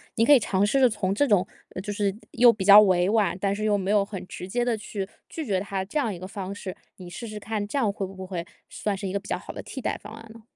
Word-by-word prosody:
“你 230 - +3
可 290 - +7
以 280 - +9
尝 200 -2 +1
试 270 +5 +2
着 255 - +6
从 200 -3 -1
这 285 - +3
种 205 -7 +3 0.3
就 205 +1 -4
是 200 -2 0 0.2
又 240 0 +6
比 210 -4 -4
较 205 +1 +10
委 185 -2 +3
婉， 205 -5 +2
但 195 +1 0
是 215 - -4
又 210 -1 +2
没 190 -1 -3
有 205 -1 +4
很 195 -2 -7
直 180 - -7
接 240 +6 -1
地 240 -2 0
去 205 -2 -5 0.2
拒 320 - -5
绝 190 -6 0
他 195 -1 -3
这 255 - -4
样 235 -8 0
一 175 - -8
个 185 - -7
方 195 -1 -6
式。 190 -2 -7 0.2
你 180 -2 -10
试 230 +7 -7
试 215 - -6
看， 210 0 -3
这 275 +7 -2
样 220 -5 +2
会 200 -1 -4
不 190 0 -8
会 175 -3 -4 0.2
算 210 -2 -2
是 195 - -4
一 185 - -4
个 200 - 0
比 200 - -13
较 - - 0
好 - - -9
的 - - -7
替 270 - -7
代 - - -2
方 - - -9
案 225 0 -11
呢？ 230 - -14
205 Hz, 325 characters per minute, -26 LUFS, 190-220 Hz, 0.3 s, 较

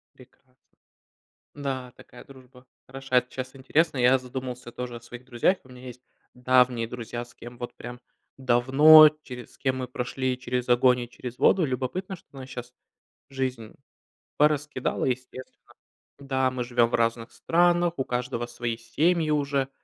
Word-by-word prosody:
Прекрасно. 130 0 -21 1.0
Да, 130 -3 -4
такая 125 - -14
дружба 130 -1 -17 0.2
хороша. 135 0 -1
Это 125 0 +1
щас 130 +1 -6
интересно. 145 +3 +1
Я 125 +2 +5
задумался 125 -1 -7
тоже 125 -1 -6
о - - -15
своих 120 +1 -11
друзьях. 130 +9 +1
И - - -23
у - - -22
меня 125 0 -11
есть 125 0 -10 0.3
давние 125 -2 +2
друзья, 120 0 -6
с 120 - -19
кем 120 +1 -11
вот 120 0 -7
прям 120 0 -9 0.4
давно, 135 +5 +7
через 125 -2 -10
с - - -21
кем 130 -2 -1
мы 130 -1 -4
прошли 125 +1 -3
через 125 -1 -3
огонь 125 +1 +4
и 120 - -7
через 125 0 -8
воду. 185 -4 +4
Любопытно, 135 +9 -3
что 175 - -22
нас 130 -1 -9
щас 125 -1 -8 0.6
жизнь 130 -5 -4 0.6
пораскидала, 150 -3 +1
естественно. 130 0 -6 0.5
Да, 130 -2 0
мы 125 -1 -3
живем 120 -1 +2
в - - 0
разных 115 0 -1
странах, 175 0 +2
у 135 - 0
каждого 125 -1 -3
свои 120 -1 -4
семьи 155 +8 +1
уже, 140 -2 0
125 Hz, 160 wpm, -26 LUFS, 120-135 Hz, 1.0 s, давно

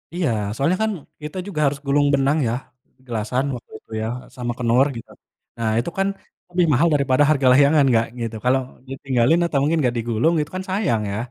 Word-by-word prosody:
Iya 175 -7 0 0.3
soalnya 165 +9 +1
kan 220 - +1 0.3
kita 150 +5 -6
juga 175 -7 -4
harus 140 0 -2
gulung 145 +1 +2
benang 140 +3 +2
ya, 115 - -1 0.5
gelasan 120 +3 -2
waktu 120 - -12
itu - - -29
ya 110 - -2 0.3
sama 120 -1 -3
kenor 125 +2 +3
gitu, 115 - -9 0.5
nah 115 - 0
itu 125 - -2
kan 195 0 +2 0.4
lebih 175 0 +1
mahal 155 +7 +4
daripada 140 -1 +3
harga 140 -4 +3
layangan 145 +3 +5
Kak 115 0 +2
gitu 115 -1 -4
kalau 130 +1 +3 0.3
ditinggalin 135 +2 +1
atau 170 -4 0
mungkin 155 +4 +1
nggak 125 - +2
digulung 115 +7 +1
itu 150 - -1
kan 185 - -3
sayang 185 - 0
ya, 100 - -3
135 Hz, 190 wpm, -21 LUFS, 120-155 Hz, 0.5 s, layangan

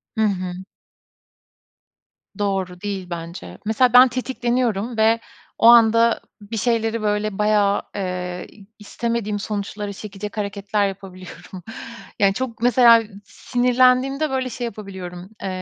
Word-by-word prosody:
Hı 220 - 0
hı. 185 -4 0 1.9
Doğru. 190 -3 -2
Değil 195 -3 -4
bence. 170 0 -7
Mesela 230 +3 +2
ben 250 +1 +9
tetikleniyorum 245 -3 -2
ve 220 +1 +3 0.4
o - - +4
anda 230 0 +6 0.2
bir 210 +2 -6
şeyleri 225 0 0
böyle 210 -1 -1
bayağı, 210 -1 +2
eee, 180 -2 -4 0.3
istemediğim 215 0 -3
sonuçları 205 0 -4
çekecek 205 +1 -8
hareketler 200 0 -1
yapabiliyorum 185 -1 -10 0.6
Yani 200 -2 +4
çok 230 0 -5
mesela 235 -1 +6 0.2
sinirlendiğimde 255 +5 +2
böyle 260 -1 -2
şey 245 +1 -5
yapabiliyorum, 190 -4 -8
eee, - - -2
210 Hz, 110 wpm, -21 LUFS, 195-235 Hz, 1.9 s, ben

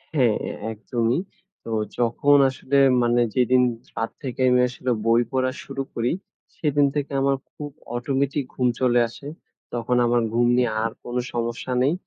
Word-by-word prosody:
হ্যাঁ, 120 -7 +3 0.4
একদমই। 115 +3 -1 0.4
তো 115 - -7 0.3
যখন 125 +4 +3
আসলে 135 +1 -1 0.2
মানে 120 0 +3
যেদিন 125 0 +4 0.3
রাত 115 - -2
থেকে 130 -1 -4
আমি 125 0 +4
আসলে 125 0 -3
বই 115 +1 +4
পড়া 130 -1 +1
শুরু 135 0 -4
করি, 120 +1 0 0.5
সেদিন 145 -2 +2
থেকে 145 -1 -2
আমার 135 0 +2 0.2
খুব 145 -1 -7 0.3
অটোমেটিক 135 +3 -1
ঘুম 125 - +1
চলে 120 -2 +3
আসে। 140 +5 -11 0.5
তখন 120 +1 -1
আমার 120 0 +2
ঘুম 120 +1 +3
নিয়ে 125 -2 +2
আর 115 - -1
কোন 120 - -6 0.2
সমস্যা 120 +1 -3
নেই। 140 +5 +3
125 Hz, 155 wpm, -23 LUFS, 120-135 Hz, 0.5 s, যেদিন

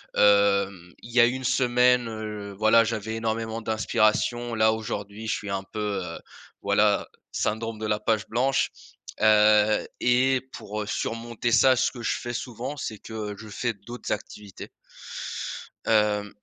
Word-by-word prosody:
hem, 100 -3 +3
il 120 - -10
y 125 - +3
a 120 - +8
1 130 +2 -1
semaine, 125 -1 +3
heu, 105 -2 -6
voilà, 110 +2 +5
j'avais 110 -1 -3
énormément 115 0 -2
d'inspiration. 110 +2 +1
Là, 110 0 +4
aujourd'hui, 105 0 -5
je - - +1
suis 105 - -6
un 95 0 -2
peu, 105 -1 -3
heu, 85 -2 -7 0.4
voilà, - - +2 0.2
syndrome 110 0 -2
de 110 - -4
la 105 0 0
page 110 -4 0
blanche, 130 +4 +1 0.5
heu 105 0 +5
et 130 +1 +3
pour, 105 +1 -5
heu, 105 - -9
surmonter 115 +2 -3
ça, 130 +3 +6
ce 130 +1 +1
que 120 - -9
je 115 - -1
fais 120 0 -5
souvent, 125 +4 -5
c'est 110 -5 -5
que, 110 - -11 0.2
heu, - - -11
je 110 - -10
fais 120 +3 -2
d'autres 110 +5 -8
activités. 105 -2 -6 1.2
Hem, 105 -2 +2
110 Hz, 155 wpm, -26 LUFS, 105-120 Hz, 1.2 s, a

